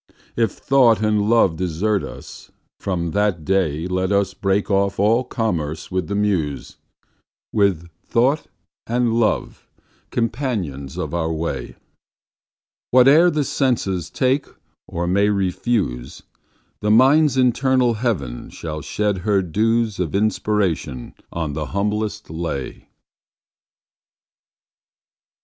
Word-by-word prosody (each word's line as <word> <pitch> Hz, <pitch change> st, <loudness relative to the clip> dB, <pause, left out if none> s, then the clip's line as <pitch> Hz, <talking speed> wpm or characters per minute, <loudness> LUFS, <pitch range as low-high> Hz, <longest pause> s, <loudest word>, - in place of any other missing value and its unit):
—If 115 Hz, -3 st, +1 dB
Thought 125 Hz, -5 st, +3 dB
and 105 Hz, -1 st, +1 dB
Love 105 Hz, -8 st, +3 dB
desert 95 Hz, +3 st, 0 dB
us, -, -, -10 dB, 0.3 s
from 85 Hz, -4 st, -2 dB
that 100 Hz, -5 st, 0 dB
dayLet 90 Hz, 0 st, 0 dB
us 100 Hz, -1 st, +1 dB
break 100 Hz, +2 st, 0 dB
off 100 Hz, 0 st, +1 dB
all 110 Hz, +5 st, +3 dB
commerce 85 Hz, -, -3 dB
with 90 Hz, -3 st, -1 dB
the 100 Hz, -, -3 dB
Muse:With 95 Hz, 0 st, -3 dB, 0.2 s
Thought 135 Hz, +6 st, +1 dB, 0.4 s
and 120 Hz, 0 st, +1 dB
Love 115 Hz, -2 st, -1 dB, 0.4 s
companions 110 Hz, -, -3 dB
of -, -, -4 dB
our 80 Hz, -1 st, -1 dB
way—Whate'er 125 Hz, -, 0 dB
the 150 Hz, -3 st, 0 dB
senses 100 Hz, -, -1 dB
take 130 Hz, +2 st, 0 dB, 0.4 s
or 85 Hz, +1 st, -3 dB
may 100 Hz, +4 st, +2 dB
refuse,—The 95 Hz, -, -3 dB
Mind's 135 Hz, +5 st, +5 dB
internal 130 Hz, -1 st, +3 dB
heaven 105 Hz, -, -3 dB
shall 75 Hz, -1 st, -6 dB
shed 105 Hz, +5 st, -1 dB
her 100 Hz, 0 st, +1 dB
dewsOf 105 Hz, -1 st, 0 dB
inspiration 100 Hz, -, -1 dB, 0.2 s
on 80 Hz, -3 st, -3 dB
the 75 Hz, 0 st, -3 dB
humblest 105 Hz, -2 st, -2 dB
lay. 80 Hz, -5 st, -5 dB
100 Hz, 100 wpm, -21 LUFS, 85-115 Hz, 0.4 s, Mind's